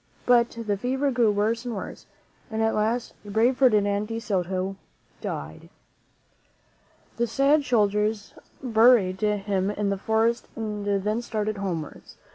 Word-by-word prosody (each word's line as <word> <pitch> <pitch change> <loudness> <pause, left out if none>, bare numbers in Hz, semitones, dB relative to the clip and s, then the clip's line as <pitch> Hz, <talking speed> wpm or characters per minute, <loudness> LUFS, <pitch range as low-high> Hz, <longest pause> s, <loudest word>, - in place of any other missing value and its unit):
But 240 -1 +4 0.2
the 205 -1 0
fever 265 +6 0
grew 240 -4 +3
worse 220 +3 0
and 240 -3 -4
worse, 195 - -8 0.4
and 220 -1 -1
at 225 - +2
last 225 +3 -1
the 205 - -11
brave 230 +5 +2
Ferdinand 210 -5 +3
de 225 0 -4
Soto 190 -3 -2 0.5
died. - - -6 1.5
The 235 0 +1
sad 280 +5 +3
soldiers 210 -3 0 0.3
buried 220 -6 +4
him 200 -2 0
in 205 -1 -1
the 195 - -2
forest 225 +3 +1
and 210 -2 -4 0.2
then 215 +3 0
started 215 -2 -3
homewards. 175 -6 -5
215 Hz, 135 wpm, -25 LUFS, 205-235 Hz, 1.5 s, But